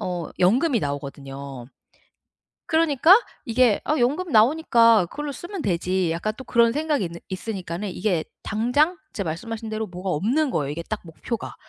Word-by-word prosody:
어 175 -3 -3
연금이 240 - +3
나오거든요. 140 -2 -6 1.0
그러니까 320 - +5 0.3
이게 235 -2 +3
'아 305 - +1
연금 300 +9 0
나오니까 230 - +5
그걸로 295 +5 -5
쓰면 345 +7 -7
되지.' 180 -1 0
약간 170 +6 -2
또 260 - -8
그런 235 -2 +3
생각이 300 -8 0
있는 170 0 -7
있으니까는 190 -1 -4
이게 180 -5 0 0.2
당장 250 - +1 0.2
진짜 200 - -3
말씀하신 220 +7 -5
대로 215 0 -3
뭐가 180 +1 -6
없는 250 - +1
거예요 140 -2 -1
이게 170 +3 -5
딱 215 +4 -4
목표가. 210 +8 -6
215 Hz, 355 characters per minute, -24 LUFS, 175-260 Hz, 1.0 s, 그러니까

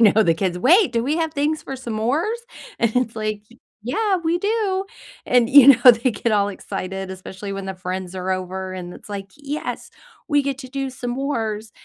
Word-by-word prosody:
you 215 -2 +6
know, 220 - +6
the 165 - +3
kids, 180 0 -1
"Wait, 345 - +5
do 230 0 0
we 300 +4 0
have 320 -2 -1
things 300 +2 0
for 270 - -6
s'mores?" 260 - -1 0.4
and 230 +1 +1
it's 250 -2 0
like, 215 -1 -3 0.4
"Yeah, 385 - 0
we 335 +2 +1
do." 400 -1 0 0.4
and, 245 -2 +3
you 280 -1 +9
know, 250 -2 +9
they 235 +2 0
get 230 +1 -1
all 205 -1 +3
excited, 190 -1 -5
especially 190 +2 -7
when 195 -1 -5
the 190 - -4
friends 185 0 -5
are 185 +1 -3
over, 185 0 -4
and 180 -1 -7
it's - - -14
like, 195 -1 -6
"Yes. 295 +1 -5 0.4
We 290 -2 +3
get 275 -1 -2
to 260 -2 -9
do 275 0 -2
s'mores." 240 -4 -3
235 Hz, 195 wpm, -22 LUFS, 195-285 Hz, 0.4 s, you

